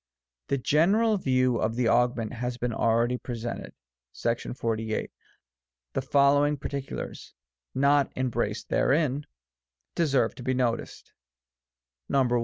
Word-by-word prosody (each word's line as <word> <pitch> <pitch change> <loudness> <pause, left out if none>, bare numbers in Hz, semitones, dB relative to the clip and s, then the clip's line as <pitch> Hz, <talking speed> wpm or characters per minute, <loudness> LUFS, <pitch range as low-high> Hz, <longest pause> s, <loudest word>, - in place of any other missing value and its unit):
A 140 - +2
general 195 - +3
view 130 -4 +2
of 110 +1 0
the 120 -1 +1
Augment 120 -1 +2
has 125 0 -3
been 120 -1 -2
already 115 +3 +1
presented 120 -1 -5 0.4
(§48). 115 -2 -2 0.8
The - - 0
following 145 +2 +3
particulars, 140 0 -6 0.4
not 140 0 +3
em 130 -1 -1
braced 110 -2 -2
therein, 145 0 +1 0.7
deserve 135 -8 +2
to 125 - -10
be 130 +1 0
noticed: 120 -2 -2 1.0
I. 135 -3 +3
125 Hz, 110 wpm, -27 LUFS, 120-140 Hz, 1.0 s, general